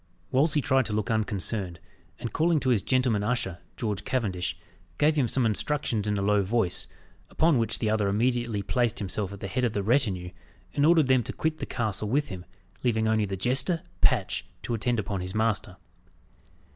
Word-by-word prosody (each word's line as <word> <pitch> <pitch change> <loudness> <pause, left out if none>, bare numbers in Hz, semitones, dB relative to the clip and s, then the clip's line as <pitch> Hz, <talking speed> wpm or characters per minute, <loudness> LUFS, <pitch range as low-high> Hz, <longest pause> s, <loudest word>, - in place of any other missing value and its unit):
Wolsey 145 +3 +3
tried 135 -1 +3
to 105 - -3
look 105 +1 -1
unconcerned, 105 -4 -1 0.4
and 115 - -6
calling 160 0 +3
to 130 - 0
his 110 -5 +3
gentleman 130 -4 +1
usher, 105 -5 -1 0.2
George 105 -4 -2
Cavendish, 95 -9 -2 0.4
gave 150 +1 +3
him 140 -5 +2
some 125 +2 +1
instructions 110 -1 0
in 105 -1 0
a 100 - -1
low 105 0 +3
voice, 100 -1 0 0.4
upon 160 -5 +3
which 115 -1 0
the 110 - 0
other 110 -2 +1
immediately 115 0 0
placed 120 0 0
himself 100 0 -3
at 100 - -9
the - - -3
head 125 +6 -1
of 120 -3 +1
the 100 - -1
retinue, 100 -7 +1 0.4
and 145 +1 +3
ordered 165 -3 +5
them 130 -1 +4
to - - -5
quit 155 0 -1
the - - -4
castle 110 -2 -2
with 145 +5 +1
him, 90 -2 -7 0.4
leaving 110 -3 +2
only 110 -1 +2
the 95 -1 -4
jester, 135 - +1 0.2
Patch, 115 -8 +2 0.2
to - - -2
attend 120 +2 0
upon 100 -2 -2
his 90 +2 -5
master. 110 -1 0
110 Hz, 190 wpm, -27 LUFS, 100-130 Hz, 0.4 s, ordered